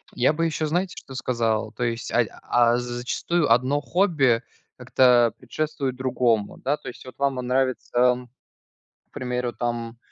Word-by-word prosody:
Я 125 Hz, +4 st, +3 dB
бы 165 Hz, +2 st, 0 dB
еще, 160 Hz, -1 st, -1 dB
знаете, 175 Hz, +4 st, -1 dB
что 135 Hz, -, -10 dB
сказал? 115 Hz, -4 st, -1 dB
То 115 Hz, +4 st, -5 dB
есть, 115 Hz, -1 st, -2 dB
ай 120 Hz, -1 st, +2 dB, 0.2 s
а 120 Hz, 0 st, +3 dB
з -, -, -1 dB
зачастую 125 Hz, +5 st, -1 dB
одно 130 Hz, +5 st, +3 dB
хобби 145 Hz, -, +2 dB, 0.4 s
как-то 120 Hz, -3 st, +4 dB
предшествует 145 Hz, -3 st, -3 dB
другому, 125 Hz, -4 st, 0 dB
да. 145 Hz, +3 st, -1 dB
То -, -, -13 dB
есть 125 Hz, -, -12 dB
вот 130 Hz, -, -11 dB
вам 140 Hz, -1 st, +1 dB
нравится, 130 Hz, 0 st, -1 dB
м, 125 Hz, 0 st, +3 dB, 0.8 s
к -, -, -55 dB
примеру, 125 Hz, -1 st, -3 dB
там, 120 Hz, -1 st, -4 dB
125 Hz, 160 wpm, -24 LUFS, 120-140 Hz, 0.8 s, как-то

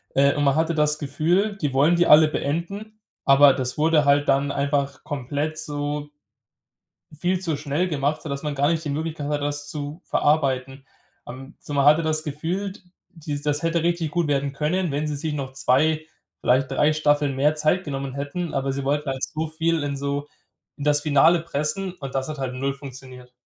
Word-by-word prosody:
Äh, 140 Hz, +1 st, +4 dB
und 145 Hz, -1 st, +1 dB
man 140 Hz, 0 st, +3 dB
hatte 160 Hz, +1 st, +1 dB
das 150 Hz, 0 st, +2 dB
Gefühl, 170 Hz, +8 st, 0 dB
die 145 Hz, -7 st, -2 dB
wollen 150 Hz, +6 st, +4 dB
die 175 Hz, -, +3 dB
alle 155 Hz, +1 st, +7 dB
beenden, 200 Hz, +10 st, -4 dB, 0.2 s
aber 140 Hz, -1 st, +7 dB
das 130 Hz, +1 st, -3 dB
wurde 155 Hz, -1 st, +3 dB
halt 145 Hz, 0 st, +3 dB
dann 140 Hz, +1 st, +2 dB
einfach 140 Hz, -1 st, -1 dB
komplett 145 Hz, +2 st, -3 dB
so 145 Hz, -1 st, -3 dB, 1.0 s
viel 175 Hz, +4 st, -1 dB
zu 165 Hz, -5 st, -1 dB
schnell 150 Hz, +5 st, -1 dB
gemacht, 150 Hz, 0 st, -1 dB
sodass 140 Hz, -2 st, -5 dB
man 150 Hz, -1 st, -3 dB
gar 140 Hz, +1 st, +2 dB
nicht 165 Hz, -1 st, 0 dB
die 145 Hz, -, -2 dB
Möglichkeit 155 Hz, 0 st, -3 dB
hatte, 145 Hz, -1 st, -1 dB
das 145 Hz, 0 st, -3 dB
zu 145 Hz, +2 st, -6 dB
verarbeiten. 135 Hz, -2 st, 0 dB, 0.4 s
Ähm, 130 Hz, +3 st, -9 dB
so -, -, -8 dB
man 140 Hz, -1 st, +3 dB
hatte 150 Hz, +3 st, +6 dB
das 155 Hz, 0 st, -1 dB
Gefühl, 170 Hz, +7 st, -3 dB
d 210 Hz, -, -16 dB, 0.4 s
die 150 Hz, -3 st, -5 dB
das 145 Hz, +1 st, -1 dB
hätte 165 Hz, 0 st, +1 dB
richtig 170 Hz, -3 st, 0 dB
gut 170 Hz, 0 st, 0 dB
werden 140 Hz, -1 st, 0 dB
können, 160 Hz, +4 st, -1 dB
wenn 145 Hz, +2 st, -1 dB
sie 150 Hz, -, -2 dB
sich 150 Hz, +1 st, -3 dB
noch 135 Hz, -2 st, -4 dB
2, 150 Hz, +4 st, +2 dB, 0.4 s
vielleicht 130 Hz, +2 st, +2 dB
3 150 Hz, +1 st, +3 dB
Staffeln 145 Hz, -2 st, +1 dB
mehr 150 Hz, +3 st, +3 dB
Zeit 155 Hz, +5 st, +1 dB
genommen 135 Hz, -2 st, -4 dB
hätten, 145 Hz, +5 st, -4 dB
aber 135 Hz, 0 st, -1 dB
sie 140 Hz, +1 st, -3 dB
wollten 145 Hz, +1 st, -1 dB
halt 135 Hz, 0 st, -3 dB
so 160 Hz, +1 st, -2 dB
viel 160 Hz, 0 st, -1 dB
in 140 Hz, -1 st, -2 dB
so 140 Hz, +1 st, -3 dB, 0.5 s
in 145 Hz, -, -9 dB
das 145 Hz, 0 st, +3 dB
Finale 155 Hz, +3 st, +5 dB
pressen 170 Hz, +4 st, -2 dB
und 135 Hz, -6 st, -8 dB
das 130 Hz, +1 st, -2 dB
hat 155 Hz, -2 st, -5 dB
halt 130 Hz, -1 st, -3 dB
0 135 Hz, +1 st, -2 dB
funktioniert. 130 Hz, -2 st, -11 dB
145 Hz, 195 wpm, -23 LUFS, 140-160 Hz, 1.0 s, alle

